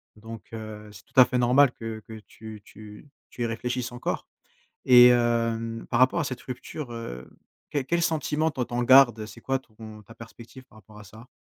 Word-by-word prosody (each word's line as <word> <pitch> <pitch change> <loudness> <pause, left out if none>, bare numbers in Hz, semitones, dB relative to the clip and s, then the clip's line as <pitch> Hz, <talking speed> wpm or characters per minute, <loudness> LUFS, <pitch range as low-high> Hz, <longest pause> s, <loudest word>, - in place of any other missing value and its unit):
donc 110 0 -10
heu, 110 -1 -9
c'est 95 -1 -15
tout - - -32
à 125 - +9
fait 125 - -2
normal 125 +2 +4
que 115 -1 -7
que 110 - -10
tu 110 -1 -11
tu 105 +5 -14 0.2
tu 120 - -6
y - - 0
réfléchisses 125 +2 -4
encore, 120 - -4 0.6
et 125 -1 +8
hem, 115 -1 0
par 120 - +1
rapport 130 +7 +3
à - - -1
cette 130 -2 -5
rupture, 130 +1 -8
heu, 65 - -8 0.4
quel 140 -3 -2
quel 170 +4 0
sentiment, 160 -1 0
toi, 125 -4 -3
tu - - -16
en 120 0 -1
gardes? 120 -4 +5
C'est 105 - -14
quoi 135 0 -1
ton 110 -3 -13
ta 115 +3 -16
perspective 115 +3 -13
par 110 - -23
rapport 105 +1 -17
à 105 - -12
ça? 110 +5 -15
120 Hz, 205 wpm, -25 LUFS, 110-130 Hz, 0.6 s, à